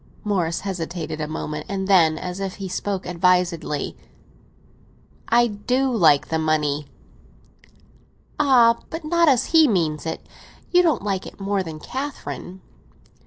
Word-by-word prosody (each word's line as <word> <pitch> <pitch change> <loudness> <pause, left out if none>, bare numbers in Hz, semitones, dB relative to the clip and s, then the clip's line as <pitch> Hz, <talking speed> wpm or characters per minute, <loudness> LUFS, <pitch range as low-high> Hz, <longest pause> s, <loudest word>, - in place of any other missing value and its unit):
Morris 180 -5 -1
hesitated 170 -4 -4
a 150 - -2
moment; 150 -1 -5
and 190 -1 -3
then, 165 -5 +4
as 180 +3 -5
if 195 -1 -4
he 195 -1 -6
spoke 190 +1 -3
advisedly—"I 180 +6 -2
do 245 +4 -1
like 155 -8 +4
the 160 - 0
money!" 150 -2 0 1.5
"Ah, 245 -5 +5
but 325 0 -6
not—but 310 +3 -3
not 335 -2 +5
as 255 -3 +3
he 320 -2 +7
means 165 - 0
it. 160 - -5 0.5
You 360 - +6
don't 320 - +1
like 195 -2 -2
it - - -13
more 200 0 -1
than 160 -4 -7
Catherine?" 260 - -6
190 Hz, 135 wpm, -22 LUFS, 160-235 Hz, 1.5 s, he